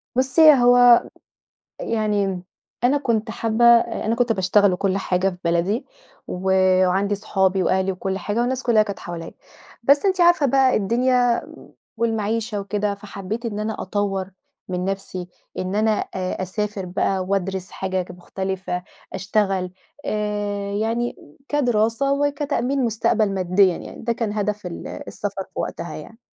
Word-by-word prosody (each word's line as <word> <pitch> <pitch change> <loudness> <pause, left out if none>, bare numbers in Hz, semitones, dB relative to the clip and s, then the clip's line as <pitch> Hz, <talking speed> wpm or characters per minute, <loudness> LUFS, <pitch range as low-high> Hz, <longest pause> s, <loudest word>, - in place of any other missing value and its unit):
بصّي، 280 +4 +6
هو 245 -1 +6 0.8
يعني 205 -4 -1 0.4
أنا 270 +4 +4
كنت 225 -5 -1
حابة 225 +1 +1
أ 235 -1 +4
أنا 225 +1 +1
كنت 240 -1 +1
باشتغل 190 0 +3
وكُلّ 195 +1 0
حاجة 190 0 0
في 180 - -9
بلدي، 170 +7 0 0.4
و 180 - -5 0.5
وعندي 200 +3 +1
اصحابي 190 -1 +1
وأهلي 190 +1 +1
وكُلّ 190 +1 -3
حاجة 205 +5 -2
والناس 260 +1 -1
كلّها 225 -3 +4
كانت 200 -2 -6
حواليّا، 170 -1 -7 0.5
بس 285 +8 +4
أنتِ 375 -2 +2
عارفة 345 -4 +5
بقى 265 0 +3
الدنيا 245 +3 +2 0.6
والمعيشة 225 -1 -1
وكده، 200 0 -2
فحبّيت 200 +3 -6
إن 210 -2 -3
أنا 215 0 -3
أطوّر 195 -1 -2 0.4
من 180 0 -2
نَفسي، 190 -2 -4 0.3
إن 185 +2 -3
أنا 220 +1 +2
أ 185 -3 -3
أسافر 200 +1 -3
بقى 185 +1 -1
وادرس 190 -1 -2
حاجَة 190 -1 -2
ج 180 - -9
مُختلفة 185 0 -4 0.3
أشتغل 195 -2 0 0.3
آآ، 205 -1 -2
يعني 230 +3 -1 0.3
كدراسة 245 -1 +1
وكتأمين 280 -2 0
مُستقبَل 215 -2 +1
ماديًا 185 0 +3
يعني، - - -10
ده 235 0 0
كان 220 -3 -2
هدف 210 -1 -2
ال 170 - -6
السَفَر - - -5
في - - -6
وقتها - - -4
يعني. 225 +1 -11
210 Hz, 140 wpm, -22 LUFS, 190-235 Hz, 0.8 s, بصّي